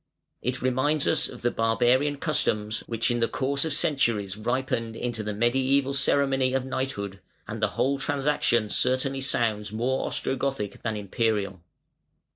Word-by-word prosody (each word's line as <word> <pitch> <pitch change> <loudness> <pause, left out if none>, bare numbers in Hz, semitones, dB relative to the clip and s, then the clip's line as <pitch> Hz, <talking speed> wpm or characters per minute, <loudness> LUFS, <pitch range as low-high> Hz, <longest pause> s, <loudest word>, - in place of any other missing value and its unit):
It 125 +1 -2
reminds 130 +4 +1
us - - +2
of 125 - -11
the 120 - +2
barbarian 125 +6 +2
customs 110 -8 0
which 115 0 0
in 120 - 0
the 115 - +2
course 140 +2 0
of 160 - -2
centuries 120 - +1
ripened 115 0 -2
into 120 -2 -3
the 105 0 -3
mediæval 130 +5 +2
ceremony 135 -2 +2
of 130 -1 0
knighthood, 115 -8 -3 0.3
and - - -5
the - - +4
whole 140 +1 +1
transaction 135 -5 +1
certainly 130 +4 +1
sounds 110 -6 0
more 125 +5 -1
Ostrogothic 135 -6 -2
than 110 -2 -2
Imperial. 100 -2 -1
125 Hz, 145 wpm, -26 LUFS, 110-135 Hz, 0.3 s, the